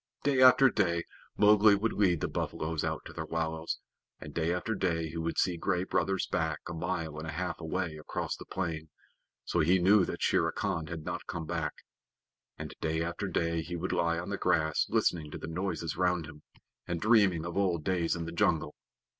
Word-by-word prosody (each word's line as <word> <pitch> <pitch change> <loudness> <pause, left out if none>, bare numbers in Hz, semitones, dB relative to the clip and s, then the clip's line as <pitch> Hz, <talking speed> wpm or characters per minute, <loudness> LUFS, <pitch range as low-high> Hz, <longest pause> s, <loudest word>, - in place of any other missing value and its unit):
Day 135 -2 +3
after 130 +1 +8
day 85 -4 +1 0.3
Mowgli 105 0 +6
would 110 +3 0
lead 90 -6 +2
the - - 0
buffaloes 80 0 -3
out - - -3
to - - -9
their - - -5
wallows, 80 0 -2 0.4
and 75 - -9
day 85 0 0
after 90 +5 -1
day 85 -5 0
he 80 - -7
would 80 0 -2
see 90 -2 +2
Gray 90 +1 0
Brother's 95 0 0
back 80 -2 -1
a - - -5
mile 80 -2 -3
and 80 - -6
a - - -3
half 90 +3 -3
away 80 0 -3
across 75 - -4
the - - -11
plain 80 -4 -3 0.6
(so 85 - 0
he 85 +4 +4
knew 95 +2 +5
that - - -4
Shere - - +2
Khan 80 -1 -2
had 80 -2 -6
not - - -4
come 85 -2 -4
back), 80 -2 -2 0.8
and - - -6
day 80 +1 0
after 85 +4 -3
day 85 -2 0
he 85 +2 -5
would 85 +2 -3
lie 85 0 +1
on 90 +3 -4
the 100 - -3
grass 80 -3 +2
listening 80 -3 +1
to - - -6
the - - -7
noises 85 -1 -3
round 90 -2 +1
him, 75 -1 -12 0.5
and 85 -1 -2
dreaming 100 -6 +4
of 85 - -5
old 90 -5 +1
days 85 -2 +1
in 85 -1 -4
the 85 - -5
jungle. 85 - +1
85 Hz, 205 wpm, -30 LUFS, 80-95 Hz, 0.8 s, after